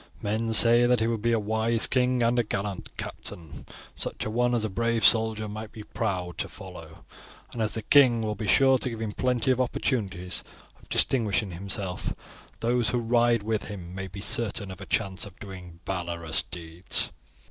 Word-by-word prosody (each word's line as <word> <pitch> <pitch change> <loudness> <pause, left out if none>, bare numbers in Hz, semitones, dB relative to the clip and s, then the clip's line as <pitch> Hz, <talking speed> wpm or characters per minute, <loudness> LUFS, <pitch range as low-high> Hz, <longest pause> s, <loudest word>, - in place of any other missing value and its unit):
Men 110 +2 -1
say 120 +2 +7
that 125 -1 +3
he 110 - +1
will 115 -1 0
be 115 +3 +1
a 115 - +3
wise 110 +2 +1
king 125 -1 +2
and 120 +1 +2
a - - +3
gallant 100 -2 -4
captain, 80 -4 -7 0.3
such - - -2
a 110 - -3
one 120 +2 +2
as 110 -2 0
a - - 0
brave 115 +1 +1
soldier 110 -1 +4
might 110 +1 -7
be 110 - -9
proud 90 -7 -3
to - - -2
follow; 90 -5 -11 0.5
and 115 - -4
as 110 - -1
the 110 - -4
king 125 -3 +5
will 105 -1 -1
be 105 +1 -5
sure 135 +3 +5
to 130 - -2
give 115 -2 -6
him 110 -2 -3
plenty 125 +2 +1
of 130 0 +2
opportunities 100 -8 -1 0.4
of - - -21
distinguishing 105 -5 +2
himself, 95 +1 -4 0.5
those 120 0 +1
who 125 - 0
ride 120 -1 +2
with 110 0 -1
him 90 -4 -8
may 95 +1 -5
be 95 +2 -9
certain 100 -2 +1
of 95 +1 -10
a 95 - -8
chance 95 -3 -1
of 100 -3 -8
doing 90 -4 -10
valorous 85 -3 -1
deeds. 85 +1 -3
110 Hz, 190 wpm, -27 LUFS, 95-115 Hz, 0.5 s, say